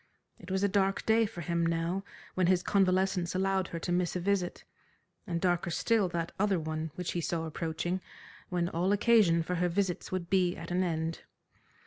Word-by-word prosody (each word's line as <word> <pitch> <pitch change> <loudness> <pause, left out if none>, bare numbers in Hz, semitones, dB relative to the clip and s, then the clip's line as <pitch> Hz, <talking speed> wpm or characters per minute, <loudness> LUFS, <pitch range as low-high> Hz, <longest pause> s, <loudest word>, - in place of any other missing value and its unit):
It - - -12
was 190 +1 0
a - - +5
dark 195 0 +1
day 225 0 +4
for 190 -5 -8
him 170 0 0
now 165 +3 0 0.3
when 185 -2 +2
his 185 0 +3
convalescence 185 -2 +2
allowed 190 0 +1
her 170 - -5
to 170 +2 -3
miss 175 0 0
a - - 0
visit, 185 -1 -1 0.6
and 170 -2 -1
darker 175 -1 +1
still 205 +3 +2
that 170 -1 -3
other 200 -3 +2
one 155 0 -3
which 180 -1 -3
he 175 - -2
saw 165 0 -2
approaching 165 +3 -3 0.5
when 175 -1 0
all 180 +4 +1
occasion 205 -6 +4
for 180 - -3
her 175 +1 +1
visits 185 0 -1
would 185 -2 -2
be 180 -1 +2
at 165 +1 -7
an 180 +1 +1
end. 165 -2 -2
180 Hz, 190 wpm, -30 LUFS, 170-190 Hz, 0.6 s, a